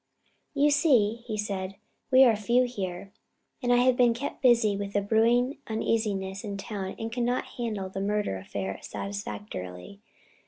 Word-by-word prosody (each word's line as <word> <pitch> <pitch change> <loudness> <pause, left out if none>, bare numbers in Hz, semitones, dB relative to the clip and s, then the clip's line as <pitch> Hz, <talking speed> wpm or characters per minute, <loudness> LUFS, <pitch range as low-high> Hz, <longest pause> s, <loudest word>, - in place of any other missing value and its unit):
"You 290 +1 +4
see," 255 -8 +3
he 215 -2 -3
said, 195 -2 -3 0.3
"we 260 0 +7
are 235 -4 +5
few 235 +4 +2
here, 195 -5 -5 0.5
and 245 -2 +1
I - - +6
have 250 +1 +4
been 245 -2 +4
kept 275 +5 -5
busy 235 -5 +4
with 200 0 -4
the 205 - +2
brewing 235 +5 +2
uneasiness 210 -3 -1
in 200 -2 -4
town 195 -2 -5
and 225 0 -4
cannot 245 +1 0
handle 215 -5 -2
the 190 +1 -5
murder 205 - -1
affair 95 0 -5
satisfactorily. 200 - -6
215 Hz, 155 wpm, -28 LUFS, 195-245 Hz, 0.5 s, we